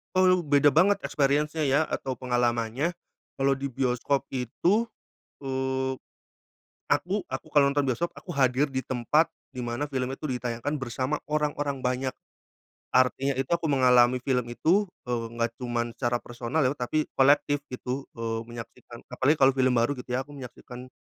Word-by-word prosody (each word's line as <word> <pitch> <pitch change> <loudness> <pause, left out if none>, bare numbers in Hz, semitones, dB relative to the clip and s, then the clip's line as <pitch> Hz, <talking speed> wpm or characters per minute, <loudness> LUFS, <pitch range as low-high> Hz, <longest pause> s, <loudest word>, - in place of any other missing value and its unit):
Oh, 185 - +5
lu 185 - +6
beda 145 0 +5
banget 195 +6 +4
experience-nya 150 +2 +1
ya 140 +3 +4
atau 130 - -3
pengalamannya. 120 +5 0 0.4
Kalau 135 0 +3
di 140 - -2
bioskop 130 +2 0
itu, 170 - +1 0.5
eee, 130 -1 -1 1.0
aku 185 +8 0
aku 130 - -6
kalau 145 -2 +5
nonton 145 0 +2
bioskop, 130 +8 -1
aku - - -14
hadir 135 +2 +2
di 130 -1 -3
tempat, 130 +6 +2 0.2
di 125 - -7
mana 120 +5 -3
film 130 -2 -2
itu 150 +2 -5
ditayangkan, 125 +3 -2
bersama 135 +3 -2
orang-orang 145 -2 -1
banyak. 130 +1 -1 0.8
Artinya 130 +1 +2
itu, 135 0 -2
aku 170 -1 +1
mengalami 125 -2 +4
film 125 -1 0
itu, 185 +11 +3 0.2
eee, 120 -2 -1
enggak 115 0 -1
cuman 120 -2 -1
secara 120 -1 0
personal, 120 +5 -3
ya 130 - +3
tapi 145 +5 -1
kolektif, 145 +1 +4
gitu, 125 +2 -4
eee, 115 -1 -2
menyaksikan. 120 0 -10
Apalagi 130 +5 +2
kalau 135 0 +6
film 130 -1 +3
baru, 120 +5 +2
gitu 125 - -9
ya 125 - +1
aku 145 - -15
menyaksikan, 125 -1 -10
130 Hz, 155 wpm, -27 LUFS, 125-145 Hz, 1.0 s, lu